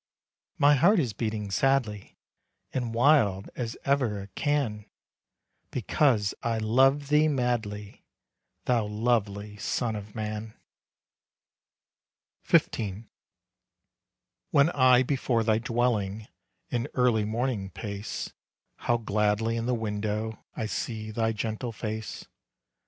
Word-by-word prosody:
"My 145 +1 +6
heart 175 +10 +5
is 125 -9 0
beating 110 -2 -3
sadly 120 -5 0 0.6
And 125 -3 -2
wild 115 -7 +3
as 115 -2 -4
ever 125 -8 +1
it 100 -1 -14
can, 125 -8 -1 0.8
Because 115 -9 +2
I 115 -1 0
love 135 +6 +3
thee 150 +1 +5
madly, 115 -7 -2 0.6
Thou 115 -4 +2
lovely 105 -2 -1
son 115 +2 -1
of 105 0 -8
man." 110 0 -4 1.9
XV. 105 -1 +2 1.5
When 145 +4 +4
I 130 -3 +5
before 130 -3 0
thy 110 -1 +2
dwelling, 110 -3 -1 0.4
In 120 -1 -1
early 125 -4 +3
morning 110 -2 -1
pace, 100 +1 -5 0.4
How 120 - +1
gladly 110 +1 +1
in 115 0 -2
the 125 - +2
window 110 0 -3
I 110 - -2
see 110 0 -4
thy 115 +1 0
gentle 110 +2 -3
face. 110 0 -5
110 Hz, 110 wpm, -28 LUFS, 105-125 Hz, 1.9 s, My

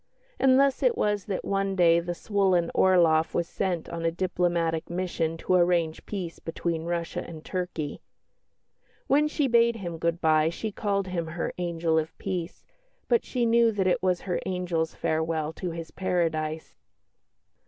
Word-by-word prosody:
And 265 0 +5
thus 275 -1 +3
it 485 -2 +2
was 205 -2 0
that 195 -3 -3
one 195 0 0
day 170 -2 +5
the 175 +1 -4
swollen 190 -4 +1
Orloff 165 -4 +4
was 170 -1 0
sent 180 -4 -2
on 170 0 -5
a 165 - +3
diplomatic 170 -2 -1
mission 170 -2 -2
to 185 - -1
arrange 175 -3 +2
peace 180 -5 -5
between 165 0 -3
Russia 170 -1 -3
and 160 -2 -10
Turkey. 180 -5 -4 1.0
When 295 +3 +3
she 300 -2 0
bade 235 -1 +4
him 175 -6 -6
good 170 +1 0
bye 155 -1 +3
she 215 +6 -4
called 200 -2 -1
him 170 -3 -2
her 165 +1 -3
"angel 165 -2 +1
of 155 +1 -5
peace," 180 -3 -5 0.4
but 470 - +3
she 245 -2 -1
knew 230 0 +4
that 195 -2 0
it 185 - +2
was 180 -1 +1
her 180 -3 -2
angel's 175 -3 -2
farewell 160 -1 -1
to 180 - -4
his 165 -1 -7
paradise. 160 -4 -2
175 Hz, 165 wpm, -27 LUFS, 165-195 Hz, 1.0 s, And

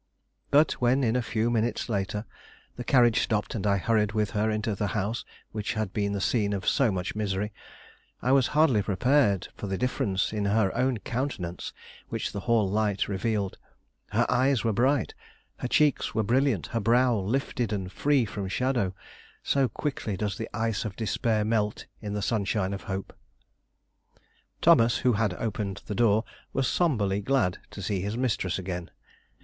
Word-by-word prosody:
But 145 +2 +5
when, 125 +3 +3
in 115 -1 +2
a 125 - +2
few 115 0 0
minutes 115 0 0
later, 105 -1 -2 0.5
the 125 - -5
carriage 120 -3 +4
stopped 105 -2 -1
and 105 -2 -2
I 100 -1 +3
hurried 105 +1 +1
with 105 -2 0
her 110 +1 +1
into 110 0 -1
the 100 +1 -1
house 110 +5 -1 0.3
which 105 -1 -3
had 110 -3 -2
been 100 -1 0
the 100 - -1
scene 105 0 +1
of 100 -1 -4
so 135 -6 +3
much 90 -1 -3
misery, 105 0 -2 0.7
I 130 - 0
was 135 -2 +5
hardly 135 -9 +5
prepared 105 -1 +2
for 105 - -6
the 95 0 -2
difference 100 -5 0
in 105 -1 -1
her 100 -1 +2
own 125 0 +1
countenance 105 -6 -4 0.4
which - - -3
the 100 - -4
hall 110 0 +2
light 105 0 0
revealed. 100 0 -2 0.5
Her - - +2
eyes 130 -2 +2
were 115 - +1
bright, 130 +6 +2 0.4
her - - -3
cheeks 145 -2 +2
were 110 - +2
brilliant, 125 - +2
her 115 - +1
brow 120 +3 +3
lifted 120 +2 -1
and 95 -3 -3
free 140 -1 +2
from 105 -2 -5
shadow; 115 -3 0 0.5
so 135 -3 +2
quickly 110 -5 -3
does 105 -2 -2
the 115 +2 -5
ice 115 -3 -1
of 105 -3 -5
despair 110 -1 0
melt 105 -1 0 0.2
in 105 -2 -4
the 105 - -2
sunshine 100 -3 0
of 100 - -6
hope. 95 -1 -4 1.5
Thomas, 115 +1 +6
who 125 - +5
had 105 -3 0
opened 100 -2 -3
the 105 - -4
door, 110 -1 +3 0.3
was 135 -1 +1
sombrely 105 - +1
glad 130 -8 +1
to 100 - -8
see 95 -1 -1
his 105 +4 -3
mistress 115 -8 0
again. 90 -2 -5
110 Hz, 175 wpm, -27 LUFS, 100-120 Hz, 1.5 s, Thomas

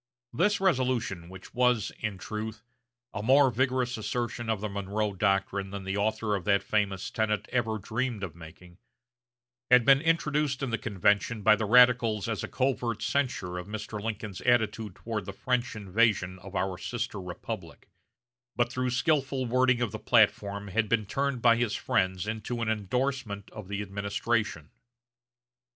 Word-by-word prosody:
This 205 +5 +2
resolution, 125 - 0
which 95 0 -12
was, 125 -4 +2
in 105 -3 -3
truth, 110 +3 -6 0.5
a 100 - -3
more 135 +4 +5
vigorous 125 0 0
assertion 120 +1 -3
of 110 -2 0
the 105 - -3
Monroe 100 +1 -2
Doctrine 95 0 0
than 100 0 -6
the 95 +1 -3
author 110 +1 0
of 95 - -4
that 100 -1 +3
famous 100 +1 -1
tenet 110 -2 -1
ever 115 -3 0
dreamed 110 +1 -3
of 90 -5 -4
making, 85 +2 -14 0.9
had 125 -2 +6
been 135 +1 +6
introduced 150 -4 +1
in 130 - -2
the 115 - -1
convention 105 +1 +1
by 110 +1 +7
the 110 0 -2
radicals 120 -3 +5
as - - -2
a - - -3
covert 120 -4 -1
censure 105 -8 -1
of 90 - -8
Mr. 105 0 -5
Lincoln's 105 -3 -5
attitude 110 -4 +1
toward 105 +1 -4
the 100 - -5
French 125 +3 -1
invasion 100 -2 +1
of 95 +2 -11
our 95 -2 -1
sister 115 -4 -4
republic; 90 -1 -7 0.7
but 120 0 +1
through 130 0 -1
skilful 135 0 +1
wording 125 0 +2
of 120 -4 0
the 110 - -6
platform 100 -3 +2
had 110 +2 0
been 110 -1 +2
turned 135 +3 -2
by 115 -1 +6
his 120 -3 0
friends 95 0 0
into 110 +2 -3
an 110 - -1
indorsement 110 0 -2
of 110 -4 -9
the 100 +1 -3
administration. 100 -3 -2
110 Hz, 160 wpm, -28 LUFS, 100-125 Hz, 0.9 s, by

